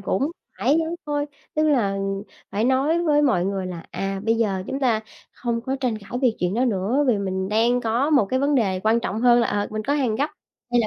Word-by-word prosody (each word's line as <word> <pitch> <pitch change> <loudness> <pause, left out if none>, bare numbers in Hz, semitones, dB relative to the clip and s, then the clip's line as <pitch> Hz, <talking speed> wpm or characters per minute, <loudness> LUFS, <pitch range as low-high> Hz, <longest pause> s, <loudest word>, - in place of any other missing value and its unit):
cũng 230 +9 0 0.3
phải 300 - +3 0.3
thôi. 290 0 -1 0.3
Tức 310 - +2
là 240 -10 +2 0.5
phải 210 +3 0
nói 275 +7 +2
với 295 -2 +3
mọi 250 -11 +2
người 195 -1 -2
là, 175 -2 -7
à, 195 +2 -3
bây 225 - +3
giờ 195 -5 0
chúng 270 - -3
ta 235 -5 +2 0.3
không 235 -1 -2
có 265 +3 -2
tranh 240 -5 0
cãi 200 - -16
về 255 - +5
chuyện 180 +1 0
đó 245 +3 +2
nữa, 230 +5 +1
vì 225 -4 +3
mình 190 -1 -2
đang 230 +4 +2
có 240 +6 0
một 270 -9 +4
cái 260 - +2
vấn 285 +1 +2
đề 195 -8 +1
quan 220 +3 +2
trọng 220 -1 -3
hơn 240 0 +5
là, 235 - +2
ờ, 205 0 0
mình 215 0 -3
có 280 - -1
hàng 255 -7 0
gấp 290 +5 0 0.4
hay 240 0 +4
là 220 - +1
230 Hz, 240 wpm, -23 LUFS, 200-270 Hz, 0.5 s, về